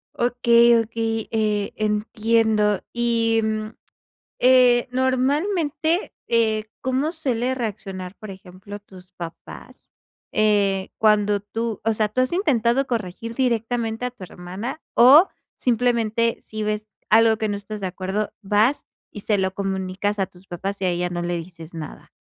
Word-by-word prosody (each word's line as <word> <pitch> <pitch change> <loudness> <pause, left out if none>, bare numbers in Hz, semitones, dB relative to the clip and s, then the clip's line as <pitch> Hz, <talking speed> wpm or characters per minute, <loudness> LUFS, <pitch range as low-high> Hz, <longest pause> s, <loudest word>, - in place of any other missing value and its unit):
Okey, 235 -1 +4
okey, 225 0 -3
eh, 210 -2 0
entiendo. 215 -1 +1
Y, 230 -1 +1
mm, 215 0 -2 0.7
eh, 250 -1 +5
normalmente, 295 - 0 0.2
eh, 220 -2 +2 0.2
¿cómo 260 +4 0
suele 260 -6 -1
reaccionar, 195 -6 -5
por 215 -2 -9
ejemplo, 190 +2 -10
tus 185 -3 -16
papás? 170 -2 -10 0.4
Eh, 200 -3 +2
cuando 210 -1 +3
tú 225 +1 -4
o 225 0 +2
sea, 215 0 +1
¿tú 255 - 0
has 255 +3 +1
intentado 270 - +2
corregir 230 0 -4
directamente 235 -1 -1
a 250 - -1
tu 240 -6 -11
hermana 190 - -7
o, 275 +9 +8 0.3
simplemente, 230 -2 +1
si 215 0 -6
ves 215 0 -3 0.2
algo 225 0 +5
que 220 -1 -1
no 205 - -1
estás 205 +1 -7
de 190 - -2
acuerdo, 190 +3 -3
vas 210 +8 +2 0.3
y 205 - -8
se 205 0 0
lo 190 0 -1
comunicas 195 +1 -2
a 195 - +1
tus 180 +1 -20
papás 195 +3 -5
y - - +1
a 185 - +2
ella 175 0 -1
no 175 0 -4
le 175 0 -2
dices 165 -1 -10
nada? 160 -3 -9
215 Hz, 145 wpm, -22 LUFS, 195-240 Hz, 0.7 s, o